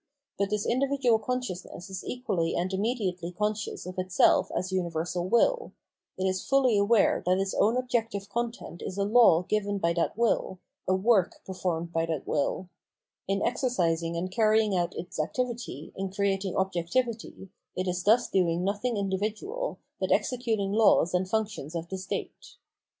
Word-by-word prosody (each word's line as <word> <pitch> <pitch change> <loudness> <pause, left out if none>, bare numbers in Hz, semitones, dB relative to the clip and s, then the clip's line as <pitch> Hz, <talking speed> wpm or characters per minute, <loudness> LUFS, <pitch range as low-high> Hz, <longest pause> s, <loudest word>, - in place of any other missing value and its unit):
But 200 0 0
this 210 0 -1
individual 260 -2 +2
con 250 +4 -1
sciousness 185 -4 -7
is 190 - -5
equally 185 -10 -1
and 180 +2 -1
immediately 190 -5 -1
conscious 210 +2 -2
of 180 0 -6
itself 185 -1 +3
as 185 +1 -2
universal 175 -1 -1
will; 475 - +2 0.4
it 190 - -1
is 185 0 0
fully 270 -4 +3
aware 205 +2 +3
that 185 +1 +4
its 195 0 -1
own 225 +4 +3
objective 225 -5 -1
content 230 -4 -4
is 185 - -5
a 200 - +1
law 205 -5 +5
given 205 +1 -1
by 170 -3 +1
that 170 +4 -1
will, 230 -5 +1 0.3
a 185 - +3
work 195 -1 +2
performed 175 -3 -3
by 165 0 +1
that 160 -4 -3
will; 155 +5 -1 0.6
in 195 +1 0
exercising 170 -9 0
and 185 +2 -3
carrying 215 0 +3
out 175 -1 0
its 175 -1 -6
activity, 235 - -3
in 195 0 -3
creating 195 -1 -1
objectivity, 190 +3 -2 0.2
it 185 +1 -2
is 180 0 -1
thus 225 +5 +4
doing 175 -2 +1
nothing 205 +4 -1
individual, 215 - -2 0.2
but - - -1
executing 225 -6 +1
laws 210 -5 +4
and 185 +1 0
functions 205 -8 -2
of 170 0 -3
the 190 - -4
state. - - -6
195 Hz, 160 wpm, -28 LUFS, 180-225 Hz, 0.6 s, law